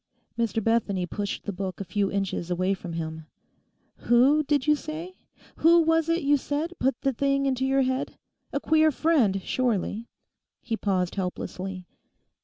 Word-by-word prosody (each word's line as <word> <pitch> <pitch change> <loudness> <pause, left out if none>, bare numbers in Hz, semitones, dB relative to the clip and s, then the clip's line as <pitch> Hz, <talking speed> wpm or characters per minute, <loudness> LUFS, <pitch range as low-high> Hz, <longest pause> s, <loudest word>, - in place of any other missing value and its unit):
Mr. 225 -1 -1
Bethany 205 -5 +1
pushed 200 +3 -4
the 205 - -3
book 190 0 -5
a - - -3
few 200 +2 -1
inches 195 -3 -2
away 185 +2 +1
from 180 -3 -7
him. 160 -1 -5 0.7
'Who, 260 +6 +4
did 290 -2 0
you 300 0 +4
say—who 330 +1 0
was 325 0 +2
it 330 -1 +1
you 290 +1 +4
said 295 +5 -3
put 265 -1 +1
the 270 - +1
thing 275 +2 +1
into 265 -1 0
your 270 0 +3
head? 260 +1 -2 0.3
A - - -1
queer 315 0 +4
friend 260 - +2
surely?' 230 -2 -1 0.5
he 235 -1 -3
paused 185 -5 -1
helplessly. 185 0 -4
235 Hz, 155 wpm, -26 LUFS, 195-290 Hz, 0.7 s, Who